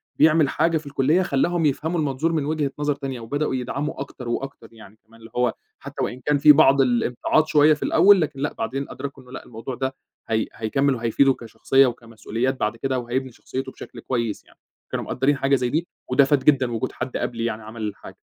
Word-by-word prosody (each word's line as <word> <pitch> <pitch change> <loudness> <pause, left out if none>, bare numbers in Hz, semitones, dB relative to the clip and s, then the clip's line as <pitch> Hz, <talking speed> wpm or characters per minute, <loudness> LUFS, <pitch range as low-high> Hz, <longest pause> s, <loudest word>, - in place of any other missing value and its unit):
بيعمل 155 -2 +4
حاجة 165 +3 +1
في 155 - -8
الكُلّية 140 +5 +2
خلّاهم 170 +1 +1
يفهموا 160 +4 0
المنظور 150 +2 0
من 155 -3 0
وجهة 150 -2 -1
نظر 145 -1 0
تانية 135 -3 -5
وبدؤوا 135 +5 -2
يدعموا 135 +4 -3
أكتر 130 -3 -7
وأكتر 135 -1 -5
يعني، 110 -2 -15
كمان 115 +1 -19
اللي 115 0 -14
هو 125 -1 +1 0.3
حتى - - -5
وإن 125 - -3
كان 150 0 +3
في 150 +1 +8
بعض 140 -2 +6
الامتعاض 125 +4 +2
شوية 155 0 +5
في 150 - -5
الأول، 200 -2 +5
لكن 150 -3 -3
لأ 145 +2 -2
بعدين 135 +5 -3
أدركوا 135 0 -7
إنه 125 - -17
لأ 130 - -8
الموضوع 120 +2 -7
ده 130 +1 -3 0.3
هي 110 -1 +1
هيكمِّل 135 +5 0
وهيفيده 120 +4 +2
كشخصية 120 +4 +2
وكمسؤوليات 115 +2 -3
بعد 105 +2 -1
كده 130 +1 -1
وهيبني 125 +2 -3
شخصيته 130 +2 -6
بشكل - - -11
كويس 115 -5 -3
يعني، - - -24 0.3
كانوا - - -3
مقدّرين 135 +2 +1
حاجة 135 +1 +2
زي 125 -2 0
دي 160 +6 -1 0.2
وده 130 +2 +5
فاد 140 -1 +2
جدًا 130 -4 +3
وجود 115 +2 -2
حد 125 0 -4
قبلي 115 -1 -3
يعني 110 -1 -3
عمل 110 +1 -9
الحاجة. 105 -2 -6
135 Hz, 205 wpm, -23 LUFS, 120-145 Hz, 0.3 s, في